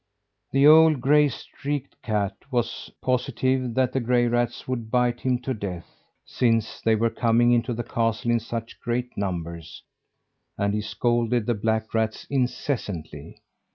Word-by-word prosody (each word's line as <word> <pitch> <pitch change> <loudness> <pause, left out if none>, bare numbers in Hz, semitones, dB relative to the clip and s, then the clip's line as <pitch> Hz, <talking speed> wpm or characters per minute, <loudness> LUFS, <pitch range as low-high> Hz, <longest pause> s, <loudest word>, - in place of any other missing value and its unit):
The 135 +1 +4
old 155 -1 +7
gray 145 +3 +4
streaked 140 +2 -6
cat 105 -3 -1
was 120 -3 -2
positive 130 -1 0
that 130 -1 +1
the 135 - +1
gray 120 0 +2
rats 120 0 -1
would 120 -4 -3
bite 125 0 +1
him 130 -1 +1
to 130 - -1
death, 95 -6 -7 0.2
since 115 -3 0
they 110 0 +3
were 115 +1 +1
coming 120 0 +3
into 120 +1 +2
the 120 0 -3
castle 115 +1 -1
in 120 - +3
such 115 0 -6
great 125 +1 -3
numbers, 85 -4 -5 0.7
and 100 0 0
he 105 - 0
scolded 120 +2 0
the 120 - +1
black 110 +1 -1
rats 110 -1 -1
incessantly. 110 - -3
120 Hz, 150 wpm, -25 LUFS, 110-125 Hz, 0.7 s, old